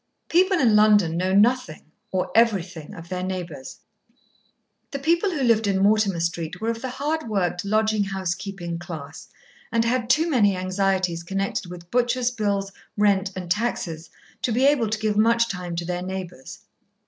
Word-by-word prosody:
People 375 +2 +4
in 235 -9 +4
London 210 -6 +5
know 185 +2 0
nothing 210 -8 +1 0.2
or 185 -1 -1
everything 190 -9 +1
of 165 0 -10
their 185 -1 -3
neighbours. 175 -8 -6 1.1
The 280 - -4
people 335 +7 +2
who 310 -7 -2
lived 225 -3 +3
in 195 -1 +1
Mortimer 200 -2 +3
Street 165 -1 -3
were 225 +1 0
of 230 0 -6
the 260 - -3
hard 290 +1 -3
worked 180 -4 -1
lodging 215 0 +1
house 190 -3 -2
keeping 175 -3 -6
class, 160 -4 -8 0.4
and 230 0 +2
had 240 0 0
too 315 +5 +3
many 210 - +3
anxieties 185 -2 0
connected 195 +1 -3
with 175 -1 -11
butcher's 245 0 +1
bills, 200 -4 -1 0.3
rent, 200 -1 +3
and 180 -2 -6
taxes, 175 -6 -2 0.3
to 245 - 0
be 250 +4 +2
able 275 -6 +3
to 215 - -1
give 215 -1 -1
much 230 +2 +4
time 180 -4 -5
to 170 0 -3
their 180 0 -3
neighbours. 180 -6 -7
200 Hz, 170 wpm, -24 LUFS, 180-230 Hz, 1.1 s, London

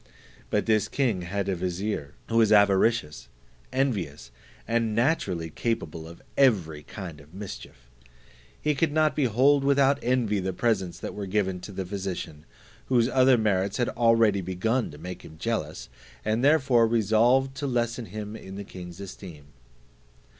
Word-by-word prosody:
But - - 0
this 110 -2 +2
king 120 -10 0
had 100 +3 -3
a 95 - 0
vizier, 90 -4 -3
who 115 - 0
was 110 -2 +4
avaricious, 100 - +3 0.4
envious, 95 - -2 0.4
and 115 -1 0
naturally 100 - 0
capable 85 -7 -3
of 85 +1 -13
every 90 - +2
kind 85 -3 -8
of 75 +5 -18
mischief. 95 -10 -9 0.7
He 150 - +1
could 150 +2 +1
not 155 0 +2
behold 135 +2 +3
without 140 0 +3
envy 120 -5 +1
the 95 0 -2
presents 95 -5 0
that - - -6
were 100 -1 -5
given 95 -2 0
to 90 - -9
the 95 -1 -4
physician, 90 -5 -5 0.4
whose 120 -3 +3
other 130 -1 +5
merits 100 -3 0
had 120 - +1
already 115 -4 +3
begun 105 +7 -1
to 75 - -11
make 90 +4 -7
him 80 - -12
jealous, 80 -6 -3 0.4
and 110 +1 +1
he 135 +4 +5
therefore 130 -7 +4
resolved 120 +4 +3
to 145 - -2
lessen 120 -1 -1
him 105 +2 -6
in 95 -3 -9
the 100 - -6
king's 90 -2 -10
esteem. 90 -7 -10
105 Hz, 155 wpm, -26 LUFS, 90-120 Hz, 0.7 s, other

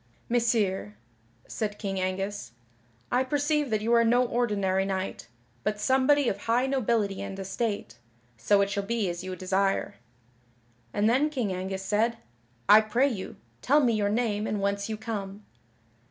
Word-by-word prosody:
"Messire," 220 - +1 0.5
said 210 -2 -3
King 195 -3 -3
Angus, 190 - -3 0.6
"I 250 +1 +3
perceive 290 +1 0
that 215 -1 0
you 230 +2 +2
are 235 0 +5
no 245 +2 +3
ordinary 205 -6 0
knight, 190 -6 -3 0.4
but 210 0 -1
somebody 265 +4 +3
of 200 - -1
high 235 +4 +1
nobility 230 -7 0
and 195 - -6
estate, 195 - -3 0.4
so 200 - +3
it 200 0 0
shall 200 0 -1
be 205 -2 -1
as 175 +1 -7
you 185 0 -5
desire." 190 +2 0 0.9
And 205 +1 +1
then 265 +6 +3
King 245 -10 -2
Angus 190 +1 -4
said: 220 +4 +1 0.5
"I 215 +1 +8
pray 240 +6 +2
you, 200 -7 -6 0.3
tell 290 +4 +4
me 245 -5 +3
your 205 -2 +1
name 215 -1 0
and 210 - -1
whence 200 +1 -1
you 215 - -3
come." 210 -2 -6
210 Hz, 155 wpm, -27 LUFS, 195-235 Hz, 0.9 s, I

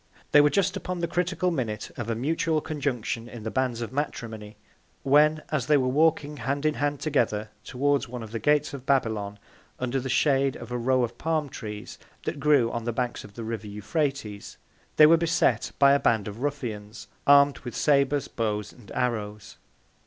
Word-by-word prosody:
They 145 - +8
were 145 - +5
just 195 +3 +1
upon 185 -1 -4
the 170 0 -1
critical 180 +1 0
Minute 115 -9 -3
of 120 -1 -5
a 115 - 0
mutual 155 +5 0
Conjunction 125 -6 -3
in 120 -3 -9
the 110 - -4
Bands 125 -3 -1
of 120 +2 -5
Matrimony, 110 -7 -4 0.5
when, 150 +3 +4
as 140 -5 -1
they 150 - +5
were 130 -2 +1
walking 150 +1 +2
Hand 140 +4 -2
in 155 - +3
Hand 145 -1 -1
together 110 -8 0
towards 140 0 0
one 120 -1 -6
of 110 - -9
the 115 - -3
Gates 150 +5 +2
of 135 -1 -8
Babylon, 110 -7 0 0.4
under 125 +1 -1
the 130 +1 -5
Shade 135 0 +2
of - - -9
a 125 - -1
Row 130 +1 +2
of 120 0 -4
Palm 155 -3 -1
trees, 105 -6 -8 0.2
that - - -4
grew 140 -5 +3
on 115 -1 -4
the 120 - 0
Banks 120 +1 -3
of 100 -1 -14
the 115 - -6
River 110 -1 -5
Euphrates, 105 - -3 0.4
they 150 - +8
were 165 +2 +7
beset 165 -8 +1
by 140 0 +6
a 140 - +4
Band 110 -6 +1
of 105 +2 -7
Ruffians, 110 -7 -4 0.2
arm'd 140 0 +6
with 120 -5 -8
Sabres, 140 -1 +2
Bows 105 -3 -3
and 120 -5 -16
Arrows. 105 -4 -3
130 Hz, 190 wpm, -26 LUFS, 115-145 Hz, 0.5 s, They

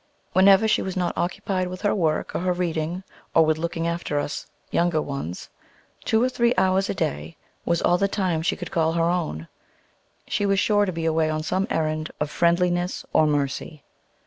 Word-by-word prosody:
Whenever 195 +3 +6
she - - +2
was 190 -1 -4
not 180 -1 -1
occupied 185 +1 -1
with 185 +3 -7
her 205 - +2
work 160 -5 0
or - - -1
her 180 +1 0
reading, 175 0 -2 0.3
or 165 - +6
with 155 0 +1
looking 165 0 -2
after 170 -3 -2
us 145 - -3 0.2
younger 170 -2 +2
ones, 140 - -5 0.6
two 220 +1 +2
or - - +4
three 240 -1 +1
hours 190 +1 +2
a - - -1
day 75 - -3 0.3
was 170 0 +1
all 175 0 +3
the 200 - +3
time 185 -5 -1
she 165 - 0
could 180 - -7
call 165 -1 +1
her 165 0 +1
own, 155 - -3 0.8
she - - -1
was 195 -1 +2
sure 205 +1 +3
to - - 0
be 165 -1 -4
away 160 -1 +2
on 155 0 -2
some 190 +5 0
errand 155 0 -1
of 150 0 -2
friendliness 175 +1 +1
or 155 - +4
mercy. 145 +1 -2
170 Hz, 195 wpm, -24 LUFS, 155-185 Hz, 0.8 s, Whenever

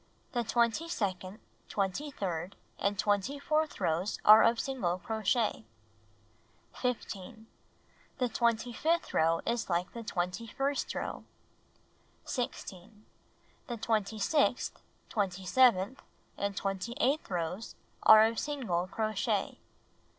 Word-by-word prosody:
The 240 -2 0
twenty 235 +7 +1
second, 190 - -3 0.3
twenty 200 +9 -1
third 185 - -4 0.2
and 200 0 0
twenty 205 +8 +1
fourth 305 +2 0
rows 170 +6 0
are 215 +1 +10
of 230 0 +4
single 215 -11 -1
crochet. 220 - 0 1.1
15. 220 -3 -4 0.7
The 250 -2 +1
twenty 235 0 0
fifth 330 +7 0
row 165 +1 +3
is 235 -2 -1
like 175 +1 -1
the 235 - -6
twenty 190 +1 -3
first 275 +5 -2
row. - - -4 1.0
16. 210 -4 -5 0.6
The 240 - -4
twenty 220 -1 0
sixth, 290 +8 +1 0.3
twenty 190 -3 -2
seventh 240 +1 +4 0.3
and 200 -1 -3
twenty 195 +4 -3
eighth 280 +5 +1
rows 180 +4 -3 0.3
are 220 0 +9
of 225 0 0
single 230 -12 -1
crochet. 215 +2 -1
220 Hz, 115 wpm, -31 LUFS, 190-245 Hz, 1.1 s, are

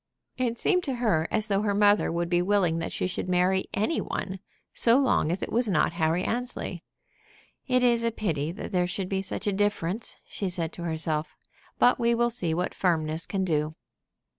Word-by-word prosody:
It 240 -2 -1
seemed 360 - +2
to 270 -3 -1
her 210 -10 +1
as 215 -1 0
though 200 -2 +1
her 205 -1 0
mother 205 0 +4
would 170 +1 -1
be 175 0 +2
willing 180 -3 +2
that 165 - -4
she - - -2
should 185 0 -3
marry 185 +1 +2
any 215 +11 0
one, 190 0 -4 0.3
so 235 +1 +4
long 260 - +2
as 180 - -2
it - - -4
was 235 -1 +2
not 185 - +2
Harry 165 +1 +1
Annesley. 245 +4 -3 0.8
"It 255 -1 +2
is 235 -1 +3
a 230 - +2
pity 165 -9 -2
that 190 - -7
there 180 -2 +1
should 185 +1 -3
be 190 -1 0
such 195 - -5
a 205 - +1
difference," 205 0 -1
she 195 - -4
said 170 -2 -2
to - - -9
herself. 160 -1 -2 0.4
"But 250 - +4
we 235 0 +3
will 240 0 +2
see 185 -9 +1
what 180 +2 -2
firmness 160 -2 0
can 190 -2 -1
do." 155 -2 0
190 Hz, 200 wpm, -27 LUFS, 170-230 Hz, 0.8 s, mother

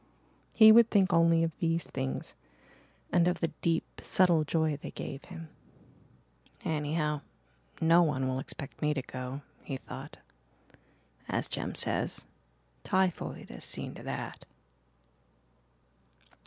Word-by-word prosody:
He 220 -1 +10
would 230 0 +7
think 195 -2 +3
only 165 0 +5
of 165 - 0
these 165 0 +1
things 130 0 -4 0.8
and 175 -1 +4
of 180 - +1
the 165 - 0
deep, 165 -1 +1 0.2
subtle 175 -4 +4
joy 155 0 +1
they 145 - -8
gave 135 - -7
him. 165 -3 -9 1.2
"Anyhow, 150 -1 0 0.6
no 165 +2 +6
one 140 -5 +1
will 130 0 -1
expect 140 +1 -6
me 150 -1 +1
to 135 - -2
go," 130 +2 -6 0.2
he 135 - -4
thought. - - -9 1.1
"As - - 0
Jem - - -4
says, - - 0 0.6
typhoid 185 -2 0
has - - -6
seen - - -2
to - - -10
that." - - -5
165 Hz, 125 wpm, -30 LUFS, 145-170 Hz, 1.2 s, He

